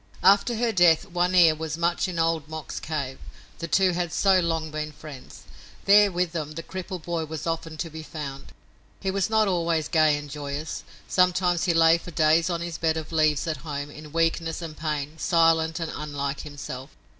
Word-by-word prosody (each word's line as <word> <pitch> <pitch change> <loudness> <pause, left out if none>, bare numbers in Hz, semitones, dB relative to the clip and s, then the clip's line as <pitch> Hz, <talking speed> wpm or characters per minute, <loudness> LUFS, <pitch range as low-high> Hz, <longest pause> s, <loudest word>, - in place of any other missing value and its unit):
After 200 +5 +5
her 235 +1 +1
death 175 -3 +4
One 180 0 0
Ear 170 -3 +7
was 160 0 -5
much 170 +2 0
in 180 -2 -5
Old 165 -2 0
Mok's 160 -1 -6
cave, 140 -4 -4 0.4
the 170 - -4
two 190 +2 +3
had 175 -1 -2
so 190 +1 +4
long 165 -2 -1
been 155 0 -4
friends. 150 -3 -11 0.4
There 205 0 +6
with 180 -1 -1
them 155 -3 -4
the 165 +2 -6
crippled 185 -1 -6
boy 170 -1 -2
was 155 0 -6
often 165 -1 -3
to 165 +2 -4
be 160 +1 -7
found. 145 -4 -7 0.5
He 190 - -2
was 195 +1 0
not 220 -1 +3
always 170 -4 0
gay 155 -2 +3
and 145 0 -7
joyous. 145 +1 -5 0.2
Sometimes 180 -1 +2
he 175 - +2
lay 165 0 +5
for 175 - -10
days 160 +2 +3
on 170 -1 -2
his 170 -1 -5
bed 160 -1 +1
of 160 0 -6
leaves 155 -2 +2
at 160 -3 -2
home, 145 0 -6
in 150 0 -11
weakness 165 0 0
and 165 -3 -7
pain, 150 0 -4
silent 165 -1 +2
and 165 -2 -3
unlike 145 -2 -4
himself. 140 -2 -7
165 Hz, 195 wpm, -25 LUFS, 155-175 Hz, 0.5 s, Ear